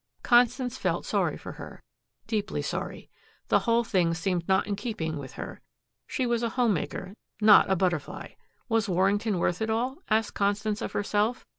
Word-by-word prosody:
Constance 245 +1 +3
felt - - -1
sorry - - 0
for - - -8
her, - - -10 0.4
deeply 210 -2 -2
sorry. - - -4 0.4
The - - +5
whole 230 +1 +4
thing 175 -6 +1
seemed 175 -1 -1
not 190 0 +3
in 205 - -2
keeping 185 -8 -3
with 130 -2 -8
her. - - -7 0.5
She 265 -4 -1
was 235 -1 +1
a 235 - 0
home 240 -2 +2
maker, 185 +2 -4 0.3
not 210 -3 +7
a 190 - +3
butterfly. 175 -5 -2 0.4
Was 225 -2 +1
Warrington 195 +3 +2
worth 175 +2 0
it 220 - 0
all? 245 +5 -1
asked 220 0 +1
Constance 205 +1 0
of - - -4
herself. 210 +3 0
210 Hz, 170 wpm, -27 LUFS, 190-230 Hz, 0.5 s, not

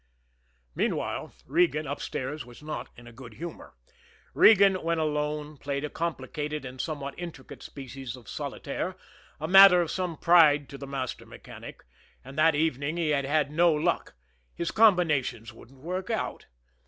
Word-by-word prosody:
Meanwhile, - - -2
Regan, 155 0 +2
upstairs, 145 +1 -4
was 120 +4 -15
not 155 0 -5
in 120 - -13
a 120 - -12
good 120 -2 -12
humor. 170 - -9 0.6
Regan, 200 -3 +7
when 165 0 0
alone, 150 -1 -2
played 140 0 -4
a 150 - -4
complicated 150 -2 -4
and 130 0 -6
somewhat 145 -3 -4
intricate 170 -6 -9
species 135 -2 -8
of 120 -5 -16
solitaire, - - -4 0.4
a 155 - -3
matter 195 0 +9
of 170 -2 0
some 180 -4 -3
pride 155 -5 +5
to 140 - -9
the 140 - -7
master 135 -2 -5
mechanic, - - -11 0.4
and 135 +1 -10
that 155 +1 +4
evening 150 0 -1
he 165 -3 0
had 140 -2 +1
had 145 0 +1
no 170 +2 +4
luck 160 +3 -1 0.4
his 170 - -2
combinations 165 - +2
wouldn't 130 +2 -17
work 185 - -4
out. 225 - -3
150 Hz, 155 wpm, -27 LUFS, 135-170 Hz, 0.6 s, matter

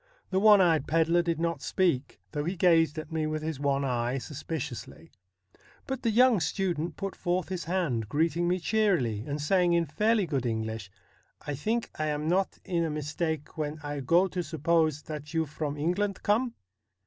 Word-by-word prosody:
The 190 - +2
one 210 -1 +7
eyed 165 -6 +3
pedlar 165 +2 +3
did 170 -2 -1
not 165 -4 -1
speak, 170 -8 0
though 145 - -2
he 180 +3 -2
gazed 165 -3 +3
at 155 - -6
me 160 -1 -1
with 155 0 -3
his 155 -3 -3
one 140 -1 +1
eye 125 0 0
suspiciously; 135 -4 -6 0.7
but 265 -1 -4
the 230 - +1
young 240 0 +5
student 170 -1 -1
put 195 -1 -4
forth 180 +1 -1
his 185 -2 -4
hand, 155 - -1
greeting 165 +5 +1
me 180 +1 +2
cheerily, 170 - +1
and 145 +1 -3
saying 175 +3 +2
in 170 -1 +3
fairly 210 +6 +2
good 135 -6 -1
English: 110 -2 -3 0.3
' - - -40
I 145 - -2
think 220 - -2
I 155 - 0
am 150 0 -2
not 185 +3 +1
in 175 -3 0
a 165 - -1
mistake 155 +1 -3
when 150 0 -2
I 145 0 -4
go 170 +8 +3
to 180 0 -2
suppose 160 -1 +1
that 150 +1 -7
you 160 0 +2
from 150 0 -4
England 180 +6 -1
come 230 +4 +1
165 Hz, 185 wpm, -28 LUFS, 145-180 Hz, 0.7 s, one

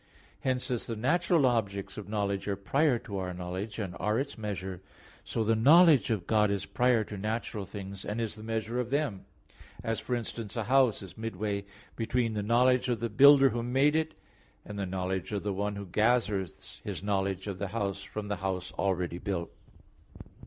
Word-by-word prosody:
Hence, 130 -1 -1
as 120 - -2
the 115 - -3
natural 165 +6 +2
objects 100 -5 0
of 105 -2 -8
knowledge 100 -2 -1
are 100 - 0
prior 130 - +2
to 100 -3 -6
our 90 -1 -4
knowledge, 95 +4 -5
and 100 -5 -4
are 105 +2 +1
its 140 +1 -3
measure, 95 -4 -5 0.4
so, 115 - -1
the 110 +1 +2
knowledge 150 +5 +6
of 105 -6 -1
God 105 -2 +3
is 100 -1 -1
prior 125 -2 +2
to 105 0 -7
natural 105 -1 -3
things, 100 -2 -7
and 105 +3 -3
is 115 -2 -2
the 110 - -9
measure 115 +2 -2
of 120 -1 -2
them; 140 -8 -1 0.6
as, 115 0 -1
for 125 - -2
instance, 115 -2 -5
a 115 - 0
house 130 -2 +3
is 95 +1 -11
midway 105 -2 -3 0.3
between 115 0 0
the 105 - -1
knowledge 125 +4 +3
of 120 -3 0
the 115 +1 -2
builder 135 +4 +7
who 120 - -2
made 135 +5 +2
it, 160 0 0 0.5
and 105 -1 -6
the 100 - -2
knowledge 95 +1 -2
of 100 -2 -2
the 100 -1 -1
one 100 +2 -2
who 100 0 -6
gathers 105 -2 0
his - - -5
knowledge 95 -2 -1
of 100 -3 -5
the 100 - -2
house 100 -1 -2
from 105 +2 -6
the 100 -1 -2
house 95 -1 -3
already 90 -3 0
built. 95 -4 -3
105 Hz, 195 wpm, -30 LUFS, 100-120 Hz, 0.6 s, builder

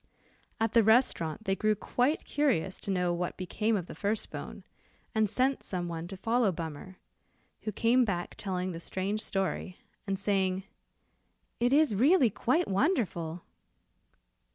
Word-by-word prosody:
At 225 -1 0
the 230 - +6
restaurant 220 - +2
they 195 - +1
grew 215 +1 +2
quite 250 +8 0
curious 225 - +1
to - - -7
know 180 -2 +1
what 175 0 -3
became 210 +4 0
of 180 - -4
the - - -9
first 210 +1 -2
bone, - - -7 0.5
and 220 -2 +2
sent 260 +5 +1
some 180 -2 -3
one 165 0 -5
to 195 +1 -8
follow 225 +1 +2
Bummer, 165 +2 -7 0.7
who 215 - -1
came 235 +5 +3
back 180 -6 -2
telling 185 -2 -3
the 165 - -6
strange 195 +5 -2
story, 190 -2 -2 0.3
and 195 0 0
saying, 190 -1 +1 1.0
"it 245 +1 +2
is 290 -3 +4
really 260 - +4
quite 320 - +1
wonderful." 190 - 0
200 Hz, 150 wpm, -30 LUFS, 180-235 Hz, 1.0 s, the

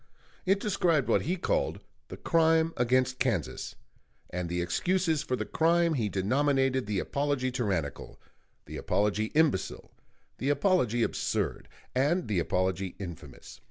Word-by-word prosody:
It 195 +1 +3
described 175 -9 +1
what - - +3
he 180 - -1
called - - 0 0.3
"The - - -8
Crime 165 -1 +3
against 130 +1 +1
Kansas"; 115 - -2 0.6
and 90 -1 -3
the 90 +1 -2
excuses 160 - +1
for 130 - -2
the - - -3
crime 170 +1 +2
he 115 -8 0
denominated 130 +5 +1
the 105 -2 -1
apology 140 +3 -1
tyrannical, 95 - -3 0.5
the - - -7
apology 105 +1 0
imbecile, 155 -11 +1 0.5
the 135 - -1
apology 140 - +2
absurd, - - -2 0.3
and 150 +8 +1
the 105 -4 +1
apology 95 +2 -1
infamous. 85 -8 -9
130 Hz, 130 wpm, -29 LUFS, 100-160 Hz, 0.6 s, It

